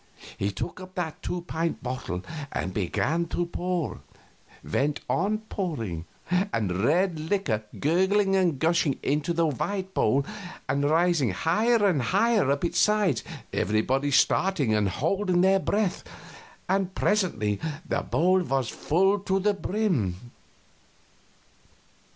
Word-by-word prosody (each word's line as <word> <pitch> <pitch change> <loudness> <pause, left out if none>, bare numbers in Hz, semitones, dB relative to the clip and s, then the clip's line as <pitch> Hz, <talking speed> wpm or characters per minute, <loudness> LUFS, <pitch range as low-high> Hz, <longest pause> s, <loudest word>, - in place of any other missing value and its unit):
He 100 - -1
took 170 - -5
up 185 +1 -11
that 170 -4 -4
two 180 - -3
pint 165 -1 -3
bottle 125 -8 -4 0.3
and 95 - -3
began 150 - 0
to 175 - -1
pour; 175 -1 -3 0.6
went 140 - 0
on 210 +4 0
pouring, 115 - -3 0.2
the 180 - 0
red 170 +4 +2
liquor 155 - -1
gurgling 190 +5 +2
and 180 -6 +2
gushing 160 -2 +2
into 150 +4 0
the 170 0 +2
white 190 - -2
bowl 135 +5 +2 0.4
and 140 +2 +1
rising 165 -5 +3
higher 210 - +2
and 175 -9 +3
higher 210 - +2
up 140 +4 +1
its 170 - 0
sides, 205 - +2 0.3
everybody 125 +8 +1
staring 145 - +2
and 105 -2 +2
holding 180 - +1
their 190 +1 +4
breath 200 0 0 0.6
and 190 -1 0
presently 110 - +1 0.3
the - - 0
bowl 185 +3 +2
was 135 -7 -1
full 195 +6 +2
to 195 -1 0
the 205 +2 +2
brim. 185 - 0
170 Hz, 125 wpm, -26 LUFS, 135-190 Hz, 0.6 s, their